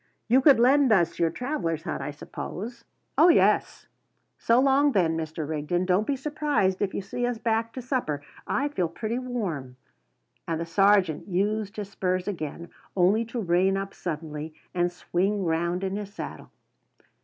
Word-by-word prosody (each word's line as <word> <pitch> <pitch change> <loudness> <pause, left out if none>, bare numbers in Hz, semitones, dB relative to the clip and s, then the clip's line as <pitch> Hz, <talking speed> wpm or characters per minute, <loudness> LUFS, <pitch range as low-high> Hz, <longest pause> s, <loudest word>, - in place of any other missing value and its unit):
You 255 +4 +5
could 275 -3 +6
lend 265 +1 +5
us 175 -5 +3
your 165 -1 +3
travellers' 170 - -3
hut, - - -3
I - - -3
suppose?" 225 +10 -7 0.3
"Oh, 325 - +8
yes." 335 - +3 0.5
"So 230 +2 +4
long 275 +1 +4
then, 170 -5 +2
Mr. 160 -1 -4
Rigden. 160 +4 -1
Don't 185 +4 +2
be 285 - +1
surprised 285 -9 0
if 195 - -1
you - - -3
see 195 +5 -4
us 245 -1 -2
back 225 0 0
to 255 - -6
supper. 235 - -2 0.2
I 285 +2 0
feel 185 -12 -1
pretty 220 +8 -3
warm." 180 - -4 0.7
And 165 -1 -1
the 165 - -2
sergeant 195 -2 +3
used 205 +3 -1
his 205 -2 -4
spurs 185 -1 -1
again, 170 -3 -5 0.3
only 195 +5 +4
to 235 +2 -5
reign 190 0 +2
up 195 0 -4
suddenly 155 -2 -5 0.2
and 175 -1 +1
swing 190 +3 -1
round 170 +3 0
in 190 0 -1
his 205 -1 -6
saddle. - - -8
195 Hz, 165 wpm, -26 LUFS, 170-235 Hz, 0.7 s, Oh